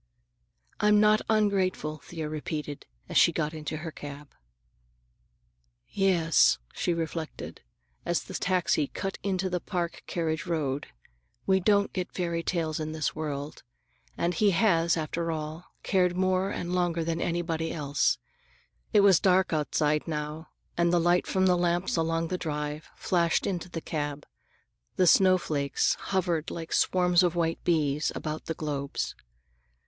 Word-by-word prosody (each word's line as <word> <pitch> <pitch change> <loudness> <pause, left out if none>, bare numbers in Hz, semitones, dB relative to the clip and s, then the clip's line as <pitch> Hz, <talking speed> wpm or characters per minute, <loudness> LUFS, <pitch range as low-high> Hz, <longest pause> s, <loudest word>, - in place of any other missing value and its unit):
"I'm 210 0 +5
not 215 0 +5
ungrateful," 190 -8 +1
Thea 160 +1 -6
repeated 150 -1 -5 0.2
as - - -1
she - - +6
got 150 +1 -2
into 155 0 -5
her 160 +1 -6
cab. 145 -1 -9 1.6
"Yes," 180 -5 +3 0.2
she - - -1
reflected, 165 -1 -4 0.4
as 175 0 0
the - - -10
taxi 180 -5 +1
cut 195 +6 -5
into 190 -1 -1
the 180 -1 -1
Park 175 -2 -3
carriage 165 0 -2
road, 145 -5 -1 0.6
"we 190 0 +3
don't 200 +1 +2
get 185 -2 -3
fairy 170 -2 -2
tales 165 -3 -1
in 155 0 -3
this 155 -1 -1
world, 150 -1 -4 0.6
and 175 +1 0
he 205 +4 +3
has, 170 -4 +3
after 165 +2 -2
all, 155 +2 -5 0.2
cared 180 -2 +2
more 185 +1 +1
and 175 -3 -4
longer 175 -2 +1
than 165 +1 -2
anybody 165 -1 -1
else." 145 -2 +1 0.8
It 210 - +6
was 195 -4 +6
dark 185 -2 +3
outside 150 0 +1
now, 150 0 -4 0.3
and 170 0 +2
the 175 - +4
light 175 +1 +2
from 190 0 +2
the 180 -1 +4
lamps 175 +1 0
along 165 0 0
the 185 - -2
drive 150 -1 -4
flashed 170 -2 +1
into 180 -2 -3
the 165 -2 -5
cab. 145 -2 -4 0.7
The 185 - +3
snowflakes 170 -7 +3
hovered 175 -5 -1
like 165 -1 -6
swarms 180 -1 +3
of 175 -2 +1
white 165 -1 -1
bees 150 -3 +1
about 155 0 -4
the 160 - -3
globes. 140 -3 -3
170 Hz, 145 wpm, -28 LUFS, 155-180 Hz, 1.6 s, she